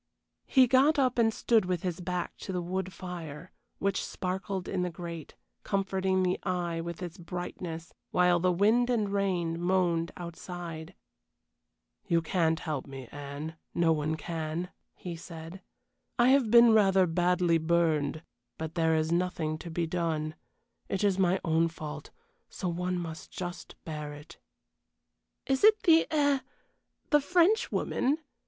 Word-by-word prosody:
He 260 Hz, -1 st, +6 dB
got 270 Hz, +5 st, +4 dB
up 255 Hz, -3 st, +2 dB
and 225 Hz, -1 st, +4 dB
stood 220 Hz, -2 st, +2 dB
with 180 Hz, -2 st, -2 dB
his 180 Hz, -1 st, -3 dB
back 180 Hz, 0 st, -3 dB
to -, -, -6 dB
the 180 Hz, -, -1 dB
wood 185 Hz, +2 st, -3 dB
fire, 170 Hz, -3 st, -8 dB, 0.3 s
which 195 Hz, -1 st, 0 dB
sparkled 190 Hz, 0 st, -3 dB
in 190 Hz, -, -1 dB
the 180 Hz, -, 0 dB
grate, 170 Hz, -2 st, -8 dB, 0.3 s
comforting 190 Hz, -1 st, 0 dB
the 180 Hz, 0 st, 0 dB
eye 175 Hz, -2 st, -2 dB
with 170 Hz, +1 st, -6 dB
its 175 Hz, +2 st, -7 dB
brightness, 170 Hz, -1 st, -6 dB, 0.2 s
while 180 Hz, -1 st, +3 dB
the 180 Hz, +1 st, +2 dB
wind 220 Hz, +7 st, +3 dB
and 220 Hz, -5 st, +1 dB
rain 175 Hz, -4 st, 0 dB
moaned 175 Hz, -2 st, +1 dB
outside. 170 Hz, -1 st, -7 dB, 1.1 s
"You 170 Hz, -3 st, +2 dB
can't 165 Hz, -1 st, +1 dB
help 150 Hz, -5 st, -3 dB
me, 135 Hz, -3 st, -9 dB
Anne; 145 Hz, +3 st, -7 dB, 0.2 s
no 170 Hz, -1 st, +3 dB
one 155 Hz, 0 st, -1 dB
can," 160 Hz, +2 st, -4 dB, 0.2 s
he 175 Hz, -2 st, -6 dB
said. 165 Hz, +2 st, -9 dB, 0.6 s
"I 240 Hz, 0 st, +5 dB
have 265 Hz, -4 st, +4 dB
been 235 Hz, 0 st, +8 dB
rather 195 Hz, -3 st, +5 dB
badly 175 Hz, 0 st, +2 dB
burned, 160 Hz, -2 st, +1 dB, 0.3 s
but 160 Hz, 0 st, -5 dB
there 160 Hz, -1 st, +2 dB
is 160 Hz, +1 st, 0 dB
nothing 170 Hz, -3 st, 0 dB
to 170 Hz, -, -8 dB
be 170 Hz, +1 st, -1 dB
done. 160 Hz, -2 st, -1 dB, 0.6 s
It 195 Hz, +1 st, -1 dB
is 195 Hz, -2 st, +2 dB
my 185 Hz, 0 st, +3 dB
own 165 Hz, 0 st, +3 dB
fault 150 Hz, -2 st, -7 dB, 0.4 s
so 185 Hz, -, -4 dB
one 180 Hz, +1 st, -1 dB
must 165 Hz, -2 st, -6 dB
just 175 Hz, -1 st, -7 dB
bear 150 Hz, -2 st, -5 dB
it." 150 Hz, +3 st, -12 dB, 1.1 s
"Is 270 Hz, +4 st, 0 dB
it 430 Hz, 0 st, +6 dB
the 325 Hz, -2 st, +5 dB
eh 285 Hz, -3 st, +3 dB, 0.7 s
the 295 Hz, -1 st, +5 dB
Frenchwoman?" 350 Hz, -, +2 dB
175 Hz, 145 wpm, -29 LUFS, 165-195 Hz, 1.1 s, been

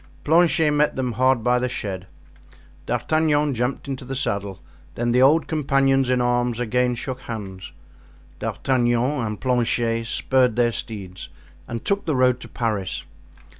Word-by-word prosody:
Planchet 160 Hz, 0 st, +4 dB
met 150 Hz, 0 st, +2 dB
them 130 Hz, -2 st, -1 dB
hard 130 Hz, 0 st, +2 dB
by 125 Hz, +1 st, +3 dB
the 125 Hz, 0 st, -1 dB
shed. 95 Hz, -5 st, -5 dB, 0.8 s
D'Artagnan 150 Hz, -2 st, +1 dB
jumped 125 Hz, +3 st, -2 dB
into 135 Hz, -1 st, -4 dB
the 135 Hz, +1 st, -5 dB
saddle, 100 Hz, -7 st, -2 dB, 0.4 s
then 120 Hz, 0 st, 0 dB
the 125 Hz, +1 st, +3 dB
old 150 Hz, +5 st, +5 dB
companions 135 Hz, -3 st, +2 dB
in 125 Hz, -1 st, +2 dB
arms 120 Hz, -1 st, +1 dB
again 125 Hz, +1 st, +1 dB
shook 130 Hz, +2 st, -5 dB
hands. 95 Hz, -5 st, -7 dB, 0.7 s
D'Artagnan 125 Hz, +1 st, 0 dB
and 105 Hz, -1 st, -4 dB
Planchet 115 Hz, -2 st, 0 dB
spurred 125 Hz, -1 st, +2 dB
their 120 Hz, -1 st, +3 dB
steeds 95 Hz, -7 st, -6 dB, 0.4 s
and 115 Hz, -1 st, -6 dB
took 200 Hz, 0 st, 0 dB
the 155 Hz, -, 0 dB
road 125 Hz, -1 st, +3 dB
to -, -, -10 dB
Paris. 105 Hz, -6 st, -2 dB
125 Hz, 145 wpm, -23 LUFS, 115-135 Hz, 0.8 s, old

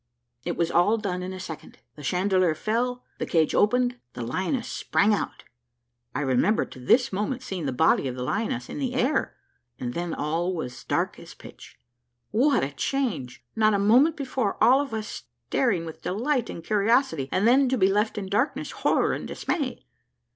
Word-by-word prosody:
It -, -, -3 dB
was 170 Hz, -1 st, +1 dB
all 205 Hz, +6 st, +4 dB
done 190 Hz, -4 st, -3 dB
in 185 Hz, +1 st, -4 dB
a 185 Hz, -, -7 dB
second; 165 Hz, -4 st, -8 dB, 0.2 s
the 150 Hz, -, -11 dB
chandelier 185 Hz, +2 st, +2 dB
fell, 245 Hz, +6 st, -1 dB, 0.2 s
the -, -, -2 dB
cage 160 Hz, -2 st, +2 dB
opened, 245 Hz, +4 st, +3 dB
and 245 Hz, -, -22 dB
the 120 Hz, -, -4 dB
lioness 190 Hz, -, -2 dB
sprang 210 Hz, +2 st, +1 dB
out. 205 Hz, -, -3 dB, 0.7 s
I 145 Hz, -, 0 dB
remember 135 Hz, -, +2 dB
to -, -, -13 dB
this 230 Hz, -, +3 dB
moment 215 Hz, +6 st, -2 dB
seeing 185 Hz, -, -4 dB
the -, -, 0 dB
body 140 Hz, +1 st, +3 dB
of 125 Hz, -, -4 dB
the 125 Hz, -, -4 dB
lioness 130 Hz, -, -2 dB
in -, -, -6 dB
the 260 Hz, -3 st, -2 dB
air, 260 Hz, +4 st, +1 dB, 0.4 s
and 120 Hz, -1 st, -3 dB
then 170 Hz, +1 st, -3 dB
all 170 Hz, +5 st, -1 dB
was 125 Hz, -7 st, -6 dB
dark -, -, -1 dB
as -, -, -12 dB
pitch. -, -, -13 dB, 0.5 s
What 265 Hz, -, +3 dB
a 135 Hz, -, -2 dB
change! 145 Hz, -, -2 dB
not 215 Hz, -1 st, +4 dB
a -, -, +3 dB
moment 245 Hz, +11 st, +4 dB
before 260 Hz, -7 st, -2 dB
all 265 Hz, +3 st, +6 dB
of 285 Hz, -, -5 dB
us 220 Hz, -1 st, -5 dB, 0.2 s
staring 200 Hz, -11 st, +1 dB
with 160 Hz, -, -9 dB
delight 240 Hz, +6 st, -1 dB
and 165 Hz, -, -7 dB
curiosity, 210 Hz, -, +2 dB
and 195 Hz, +4 st, +2 dB
then 260 Hz, +2 st, +5 dB
to 260 Hz, -, +1 dB
be 190 Hz, -, +4 dB
left 210 Hz, +3 st, +1 dB
in 200 Hz, -2 st, -3 dB
darkness, 210 Hz, +9 st, 0 dB
horror, -, -, +1 dB
and -, -, -4 dB
dismay! 275 Hz, -8 st, -3 dB
205 Hz, 190 wpm, -26 LUFS, 165-245 Hz, 0.7 s, all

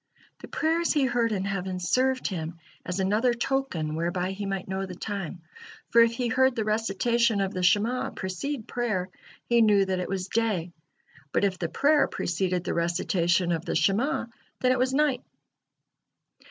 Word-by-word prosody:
The -, -, -10 dB
prayers 330 Hz, +2 st, +1 dB
he 290 Hz, -4 st, +2 dB
heard 235 Hz, -2 st, +1 dB
in 195 Hz, -2 st, -1 dB
heaven 190 Hz, -2 st, -3 dB
served 255 Hz, +8 st, +1 dB
him 165 Hz, -3 st, -3 dB, 0.3 s
as 180 Hz, +2 st, -3 dB
another 215 Hz, +6 st, +2 dB
token 235 Hz, -, -1 dB
whereby 175 Hz, +3 st, -1 dB
he 200 Hz, +1 st, -5 dB
might 195 Hz, -1 st, -3 dB
know 190 Hz, 0 st, -3 dB
the 180 Hz, -, -8 dB
time, 190 Hz, -3 st, -5 dB, 0.5 s
for 235 Hz, -, +7 dB
if 230 Hz, 0 st, +4 dB
he 245 Hz, +1 st, -1 dB
heard 260 Hz, +1 st, +3 dB
the 220 Hz, -, 0 dB
recitation 225 Hz, +1 st, +1 dB
of 195 Hz, 0 st, -1 dB
the 185 Hz, -, -3 dB
Shema' 210 Hz, +7 st, +2 dB
precede 220 Hz, -, -4 dB
prayer, 215 Hz, -7 st, -2 dB, 0.4 s
he 235 Hz, -1 st, +3 dB
knew 205 Hz, -3 st, +5 dB
that 190 Hz, -1 st, -1 dB
it 180 Hz, -, -3 dB
was 190 Hz, -1 st, -2 dB
day, 195 Hz, -6 st, -1 dB, 0.6 s
but -, -, +1 dB
if 190 Hz, -2 st, 0 dB
the 170 Hz, -, -2 dB
prayer 290 Hz, -, +3 dB
preceded 180 Hz, 0 st, -1 dB
the -, -, -2 dB
recitation 170 Hz, +1 st, +1 dB
of 165 Hz, -1 st, -1 dB
the -, -, -3 dB
Shema', 230 Hz, +10 st, +1 dB, 0.3 s
then 255 Hz, -, +3 dB
it 255 Hz, -, +1 dB
was 255 Hz, +1 st, +2 dB
night. 275 Hz, -2 st, +2 dB
200 Hz, 175 wpm, -27 LUFS, 180-240 Hz, 0.6 s, for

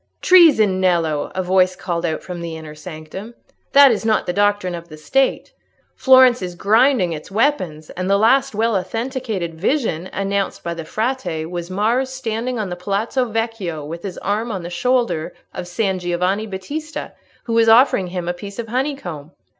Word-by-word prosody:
"Treason, 280 Hz, -, +5 dB
Nello!" 165 Hz, -5 st, +1 dB
a 185 Hz, -, -1 dB
voice 185 Hz, 0 st, +3 dB
called 175 Hz, -2 st, -2 dB
out 160 Hz, -1 st, -3 dB
from 180 Hz, -2 st, -7 dB
the 165 Hz, -1 st, -5 dB
inner 155 Hz, -1 st, -9 dB
sanctum; 165 Hz, +7 st, -9 dB, 0.4 s
"that 280 Hz, -1 st, +8 dB
is 220 Hz, -, -1 dB
not 220 Hz, -1 st, +1 dB
the 180 Hz, -, -2 dB
doctrine 205 Hz, -2 st, +1 dB
of 170 Hz, 0 st, -7 dB
the 155 Hz, -, -10 dB
State. 270 Hz, -, 0 dB, 0.4 s
Florence 260 Hz, -2 st, +6 dB
is 180 Hz, -1 st, -5 dB
grinding 220 Hz, -1 st, +3 dB
its 155 Hz, +2 st, -8 dB
weapons; 195 Hz, -, -1 dB
and 185 Hz, +1 st, -4 dB
the 200 Hz, -, +4 dB
last 230 Hz, +2 st, +3 dB
well 225 Hz, +1 st, +1 dB
authenticated 225 Hz, -3 st, -3 dB
vision 185 Hz, -, -1 dB
announced 195 Hz, 0 st, -2 dB
by 170 Hz, -, -3 dB
the 165 Hz, -1 st, -7 dB
Frate 220 Hz, -6 st, -2 dB
was 175 Hz, +1 st, -6 dB
Mars 225 Hz, +7 st, 0 dB
standing 250 Hz, -1 st, -3 dB
on 210 Hz, -4 st, -3 dB
the -, -, -3 dB
Palazzo 205 Hz, +8 st, -1 dB
Vecchio 225 Hz, -9 st, -3 dB
with 165 Hz, +3 st, -7 dB
his 190 Hz, -2 st, -6 dB
arm 215 Hz, +4 st, -1 dB
on 190 Hz, -4 st, -4 dB
the 175 Hz, -, -7 dB
shoulder 235 Hz, -4 st, 0 dB, 0.2 s
of 175 Hz, -, -6 dB
San 190 Hz, 0 st, -1 dB
Giovanni 180 Hz, +4 st, -1 dB
Battista, 290 Hz, +11 st, -6 dB, 0.3 s
who 230 Hz, -, -4 dB
was 230 Hz, 0 st, +4 dB
offering 225 Hz, -5 st, +5 dB
him 180 Hz, -1 st, -5 dB
a 175 Hz, -, 0 dB
piece 200 Hz, +3 st, -9 dB
of 230 Hz, -2 st, -5 dB
honeycomb." 225 Hz, -, -4 dB
195 Hz, 180 wpm, -20 LUFS, 175-235 Hz, 0.4 s, that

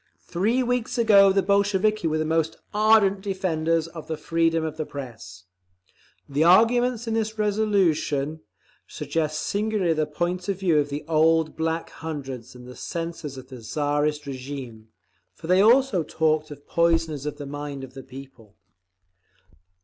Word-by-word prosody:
"Three 220 Hz, +9 st, +1 dB
weeks 245 Hz, 0 st, -1 dB
ago 200 Hz, -4 st, +6 dB
the 195 Hz, 0 st, +2 dB
Bolsheviki 200 Hz, 0 st, +2 dB
were 155 Hz, 0 st, 0 dB
the 155 Hz, -, -1 dB
most 160 Hz, 0 st, 0 dB, 0.2 s
ardent 210 Hz, -2 st, +4 dB
defenders 165 Hz, -4 st, -1 dB
of 165 Hz, -2 st, -10 dB
the 160 Hz, -, -3 dB
freedom 165 Hz, 0 st, +1 dB
of 155 Hz, -1 st, -4 dB
the 155 Hz, -, -1 dB
Press… 115 Hz, -, -9 dB, 0.8 s
The 145 Hz, +3 st, +1 dB
arguments 230 Hz, +6 st, +4 dB
in 225 Hz, -, -1 dB
this 220 Hz, -1 st, -1 dB
resolution 190 Hz, -8 st, +1 dB, 0.5 s
suggest 155 Hz, -1 st, -2 dB
singularly 205 Hz, -4 st, 0 dB
the 155 Hz, -1 st, -1 dB
point 175 Hz, +4 st, -3 dB
of 195 Hz, -, 0 dB
view 170 Hz, -6 st, +3 dB
of 145 Hz, 0 st, -1 dB
the 145 Hz, +1 st, -5 dB
old 160 Hz, 0 st, +3 dB
Black 160 Hz, +1 st, -2 dB
Hundreds 135 Hz, -6 st, -7 dB
and 125 Hz, 0 st, -12 dB
the 125 Hz, -, -10 dB
censors 165 Hz, -5 st, -5 dB
of 130 Hz, 0 st, -11 dB
the 130 Hz, -3 st, -10 dB
Tsarist 145 Hz, +4 st, -1 dB
régime—for 120 Hz, -, -10 dB
they 185 Hz, +3 st, +4 dB
also 235 Hz, -3 st, +4 dB
talked 155 Hz, -1 st, 0 dB
of 145 Hz, -1 st, -11 dB
'poisoners 165 Hz, -4 st, +1 dB
of 150 Hz, -, -4 dB
the 145 Hz, -, -7 dB
mind 145 Hz, -1 st, -6 dB
of 130 Hz, -1 st, -10 dB
the 135 Hz, -, -8 dB
people. 130 Hz, -6 st, -13 dB
160 Hz, 150 wpm, -24 LUFS, 145-195 Hz, 0.8 s, ago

